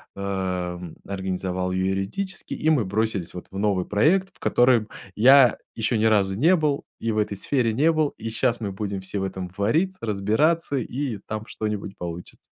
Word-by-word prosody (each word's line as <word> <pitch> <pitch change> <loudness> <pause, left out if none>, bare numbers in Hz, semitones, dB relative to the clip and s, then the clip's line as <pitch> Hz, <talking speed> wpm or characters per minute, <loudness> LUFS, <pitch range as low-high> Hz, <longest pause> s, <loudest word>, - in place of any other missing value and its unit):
эм, 90 -3 -3
организовал 95 -1 -3
её 95 0 0
юридически, 95 - -3
и 155 - 0
мы 140 -9 +3
бросились 100 -2 -1
вот 90 - -8
в 95 - -7
новый 100 -2 +1
проект, 175 - +2
в - - -18
котором 120 -3 +3 0.3
я 130 +2 +7 0.2
ещё 110 +1 0
ни 110 - +2
разу 100 -3 +3
не 160 - +4
был, 150 -4 0
и 115 - -1
в 110 - -2
этой 105 -1 0
сфере 120 +1 +1
не 150 +8 +3
был, 155 -2 +1
и 115 0 -5
щас 115 +1 0
мы 100 -3 -2
будем 100 0 -4
все 95 +2 -4
в - - -2
этом 95 -2 -5
вариться, 160 - +1
разбираться, 115 +10 +1
и 125 -2 -3
там 110 0 -4
что-нибудь 105 -3 -4
получится. 85 0 -7
105 Hz, 180 wpm, -24 LUFS, 95-130 Hz, 0.3 s, я